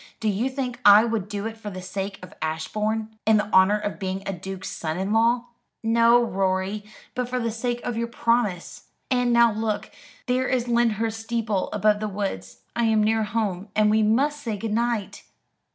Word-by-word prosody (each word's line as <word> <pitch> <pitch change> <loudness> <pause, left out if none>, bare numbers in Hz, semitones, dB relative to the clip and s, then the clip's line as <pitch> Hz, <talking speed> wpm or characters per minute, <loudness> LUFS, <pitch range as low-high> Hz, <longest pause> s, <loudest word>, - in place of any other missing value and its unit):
Do 220 - 0
you 215 +6 0
think 255 -2 -4
I 205 +2 +8
would 225 -4 -2
do 205 0 -4
it 225 0 -5
for 215 -2 -7
the 185 -2 -7
sake 195 +1 -4
of 180 - -10
Ashbourne, 215 +8 -2
and 220 -1 +5
the 210 0 -4
honour 190 +2 +6
of 205 -1 -4
being 190 0 -3
a 195 - -2
duke's 190 +1 -6
son 160 0 -3
in 195 +3 -1
law?" 235 +2 +3 0.4
"No, 230 +1 +5
Rorie, 190 +1 -1 0.3
but 250 -1 -2
for 255 - -1
the 230 -1 -1
sake 240 +2 -3
of 240 - -3
your 235 +1 -1
promise. 230 -6 -1 0.2
And 245 -1 +2
now 235 -1 +5
look, 215 -1 -2 0.3
there 255 +1 +1
is 250 -2 0
Lyndhurst 225 -2 +1
steeple 225 -4 -1
above 210 0 +2
the 215 - -2
woods. 190 - -5
I 235 - +1
am 220 -1 +3
near 220 0 +2
home, 210 -3 -2
and 210 0 +4
we 220 +1 +3
must 275 +8 +2
say 225 -6 -3
good 220 +1 -3
night." 235 -3 -1
220 Hz, 195 wpm, -24 LUFS, 200-235 Hz, 0.4 s, I